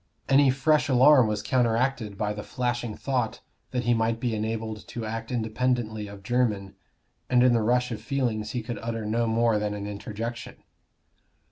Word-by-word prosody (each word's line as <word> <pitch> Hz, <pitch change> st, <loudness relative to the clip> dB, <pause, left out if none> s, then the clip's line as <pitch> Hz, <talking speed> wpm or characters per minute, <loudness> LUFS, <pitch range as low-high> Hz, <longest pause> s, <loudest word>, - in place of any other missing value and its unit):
Any 140 Hz, 0 st, +5 dB
fresh 150 Hz, +3 st, +2 dB
alarm 130 Hz, -1 st, +6 dB
was 105 Hz, -1 st, -2 dB
counteracted 120 Hz, -2 st, 0 dB
by 105 Hz, 0 st, -1 dB
the 105 Hz, -, -6 dB
flashing 120 Hz, -2 st, -3 dB
thought 125 Hz, -5 st, -2 dB, 0.3 s
that 125 Hz, -1 st, -2 dB
he 120 Hz, +1 st, +3 dB
might 115 Hz, 0 st, 0 dB
be 120 Hz, -1 st, -1 dB
enabled 110 Hz, 0 st, -3 dB
to 115 Hz, -2 st, -5 dB
act 115 Hz, +2 st, -5 dB
independently 115 Hz, -2 st, -1 dB
of 100 Hz, -1 st, -11 dB
Jermyn; 105 Hz, -4 st, 0 dB, 0.6 s
and 125 Hz, -1 st, +4 dB
in 125 Hz, -1 st, +5 dB
the 115 Hz, -, +3 dB
rush 125 Hz, +3 st, +1 dB
of 115 Hz, -, -5 dB
feelings 120 Hz, -6 st, -1 dB
he 120 Hz, 0 st, -3 dB
could 120 Hz, +1 st, -5 dB
utter 115 Hz, -1 st, -3 dB
no 115 Hz, +2 st, 0 dB
more 115 Hz, -1 st, +2 dB
than 105 Hz, 0 st, -2 dB
an 100 Hz, -1 st, -5 dB
interjection. 105 Hz, +3 st, -6 dB
115 Hz, 170 wpm, -26 LUFS, 110-125 Hz, 0.6 s, alarm